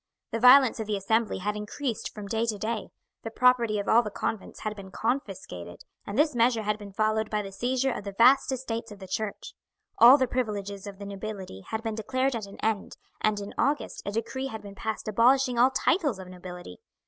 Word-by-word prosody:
The 230 - -1
violence 255 +1 +7
of 220 - -3
the 210 -1 0
Assembly 220 +3 0
had 210 +3 -2
increased 215 +3 -4
from 210 -1 -8
day 225 +3 -1
to 215 -2 -1
day. 220 +2 -3 0.3
The 225 - -5
property 235 -2 +3
of 200 - -3
all 230 - +6
the 215 - -5
convents 210 0 -4
had 215 0 -3
been 195 -2 -10
confiscated, 190 - -4 0.2
and 200 - -4
this 300 +1 +3
measure 235 -1 +2
had 210 0 -1
been 205 -1 -9
followed 215 +1 0
by 210 -1 -1
the 195 - -8
seizure 255 +6 0
of 210 - -5
the 200 -1 -7
vast 260 +3 +6
estates 230 -3 -4
of 205 - -9
the 195 - -10
church. 205 +2 -4 0.5
All 250 +4 +10
the 260 -2 +1
privileges 205 -5 -3
of 200 -1 -8
the 200 - -8
nobility 200 - -7
had 220 0 -4
been 225 -1 -2
declared 260 +4 -1
at 215 -3 -4
an 200 - -12
end, 220 -2 -1 0.2
and 215 -1 +1
in 200 0 -7
August 290 +2 0
a 200 - -3
decree 245 +5 -3
had 220 -4 -7
been 200 -1 -9
passed 220 +2 -4
abolishing 245 +3 +3
all 250 +2 +6
titles 285 - +1
of 190 -1 -9
nobility. 180 -1 -10
220 Hz, 215 wpm, -27 LUFS, 200-245 Hz, 0.5 s, All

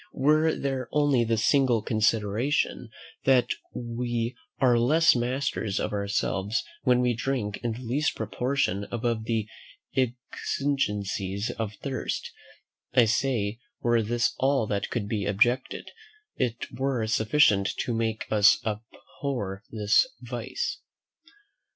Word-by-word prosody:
Were 155 +3 +3
there 135 -3 -3
only 145 -5 +3
this 115 -1 +1
single 130 -6 +3
consideration, 110 +4 0 0.4
that 130 -2 +4 0.2
we 120 0 -3 0.2
are 125 -3 +4
less 160 +7 +5
masters 120 -4 -1
of 105 - -2
ourselves 100 0 -1 0.2
when 125 0 +3
we 125 -1 +2
drink 120 -4 -2
in 120 -1 -2
the 120 - -8
least 135 +6 0
proportion 110 -1 -1
above 115 -1 -1
the 110 -2 -1 0.5
exigencies 115 -6 -1
of 110 -2 -4
thirst, 135 -2 -3 0.6
I 125 - +7
say, 115 -2 0 0.2
were 120 -1 +3
this 120 +2 +1
all 135 -3 +2
that 100 -1 -2
could 110 -4 -2
be 105 -2 -2
objected, 120 +6 +1 0.4
it 120 -2 -1
were 130 -3 -1
sufficient 110 -2 +3
to 120 - -2
make 115 -1 -1
us 105 -2 +6
abhor 110 -1 -4
this 110 - +3
vice. 125 +1 -4
120 Hz, 120 wpm, -27 LUFS, 105-130 Hz, 0.6 s, I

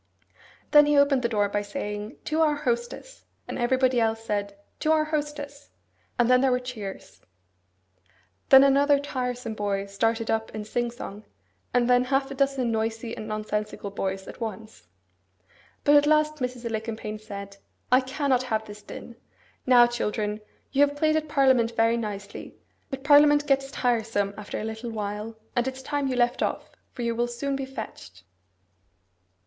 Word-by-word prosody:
Then 295 -1 +7
he 295 -1 +3
opened 280 -2 +4
the 235 - 0
door 205 -3 +1
by 205 +1 -1
saying, 205 +3 -5
'To 315 +1 0
our 305 -2 +3
hostess!' 240 - -4 0.2
and - - -5
everybody 255 0 +2
else 225 0 0
said 200 -2 -3 0.2
'To 310 - +1
our 310 -1 +4
hostess!' 295 -2 -4 0.5
and 240 - +3
then 250 0 +5
there 270 - +3
were 250 0 +2
cheers. 225 -6 -8 1.3
Then 265 0 +9
another 280 +1 +4
tiresome 250 -4 -3
boy 200 -2 -2
started 225 +3 -1
up 220 0 -2
in 215 -1 -5
sing 240 +2 -1
song, 215 -3 -8 0.5
and 245 -1 +2
then 250 0 +4
half 270 +1 0
a - - -3
dozen 270 -3 0
noisy 225 +1 -2
and 215 - -7
nonsensical 210 -1 -3
boys 190 -1 -3
at - - -10
once. 215 - -7 1.0
But 290 - +5
at 290 0 +5
last 305 0 +3
Mrs. 250 -2 -4
Alicumpaine 220 -1 -4
said, 200 -2 -8 0.3
'I 255 +1 +6
cannot 260 -1 0
have 220 -4 -2
this 210 0 -10
din. 235 +3 -10 0.5
Now, 245 -1 +8
children, 210 -3 -2 0.3
you 275 - +2
have 285 0 +3
played 310 +1 +2
at 310 -1 -1
parliament 260 -5 +3
very 230 +1 +3
nicely; 205 -3 -6 0.3
but 270 0 -6
parliament 290 0 +6
gets 275 -1 +1
tiresome 225 -6 0
after 210 -1 -6
a - - -4
little 220 +2 -5
while, 210 0 -5 0.2
and 240 +1 +1
it's 265 0 -5
time 285 0 -1
you 260 - -1
left 240 0 +1
off, - - -2 0.2
for 245 - -6
you 235 0 0
will 240 +1 0
soon 255 +4 -3
be 270 0 -3
fetched. 95 - -9
240 Hz, 165 wpm, -26 LUFS, 215-275 Hz, 1.3 s, Then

